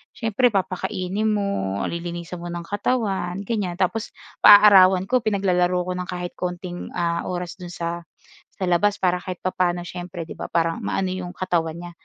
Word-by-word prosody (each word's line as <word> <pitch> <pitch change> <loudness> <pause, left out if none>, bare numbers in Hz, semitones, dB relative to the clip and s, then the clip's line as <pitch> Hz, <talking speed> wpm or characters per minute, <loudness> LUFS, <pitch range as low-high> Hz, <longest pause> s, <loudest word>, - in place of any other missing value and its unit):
Siyempre, 225 +2 +2
papakainin 190 +1 -1
mo, 200 - -1
lilinisan 170 +1 -5
mo 175 - -7
ng 175 0 -5
katawan, 200 -2 -1
ganyan. 200 -5 -2
Tapos 190 +5 -1 0.3
paaarawan 195 -3 +8
ko, 250 +6 +2
pinaglalaro 180 -5 +1
ko 180 - -4
ng 180 - -4
kahit 180 -1 -4
konting, 180 0 -4
ah, 170 -1 -1
oras 180 0 -5
do'n 175 -1 -8
sa 170 0 -4 0.5
sa 185 - -1
labas 200 +4 +2
para 180 -1 +2
kahit 185 -2 -6
papa'no 180 -1 0
siyempre, 175 -2 -7
'di - - -8
ba, - - -5
parang 165 0 0
maano 190 - 0
yung 185 -1 -4
katawan 170 -3 -1
niya. 175 0 -8
180 Hz, 165 wpm, -23 LUFS, 175-195 Hz, 0.5 s, paaarawan